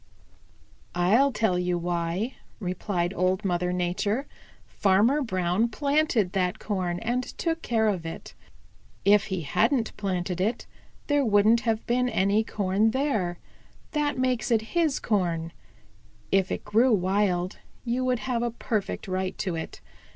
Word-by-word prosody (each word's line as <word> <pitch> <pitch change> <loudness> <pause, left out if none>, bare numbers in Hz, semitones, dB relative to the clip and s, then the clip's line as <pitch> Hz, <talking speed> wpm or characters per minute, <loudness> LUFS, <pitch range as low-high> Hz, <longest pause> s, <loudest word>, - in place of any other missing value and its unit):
"I'll 215 +11 +4
tell 210 -7 +1
you 180 0 0
why," 175 +6 -2 0.2
replied 180 -2 -2
Old 185 +3 0
Mother 180 -1 0
Nature. 180 +8 -1 0.4
"Farmer 210 +9 +2
Brown 185 -1 0
planted 280 -6 +1
that 180 -2 0
corn 185 -4 -2
and 245 +2 0
took 330 +5 -3
care 225 -5 +1
of 190 -5 0
it. 165 0 -7 0.7
If 205 +1 +5
he 190 -4 -3
hadn't 220 - +1
planted 180 -2 -2
it, 220 +5 -1 0.4
there 290 -1 +2
wouldn't 215 0 +4
have 225 -2 -1
been 250 +1 +1
any 200 +1 +2
corn 205 +1 +1
there. 220 -10 0 0.5
That 295 -3 0
makes 255 -2 0
it 225 -1 0
his 325 -5 +2
corn. 170 -6 -1 0.8
If 190 -1 +2
it - - -3
grew 225 +5 +3
wild, 185 -1 0 0.3
you 245 +2 0
would 255 -2 0
have 245 -3 -1
a 240 - 0
perfect 220 -4 -3
right 185 0 -2
to 185 -4 -2
it. 160 -1 -6
205 Hz, 140 wpm, -26 LUFS, 180-240 Hz, 0.8 s, If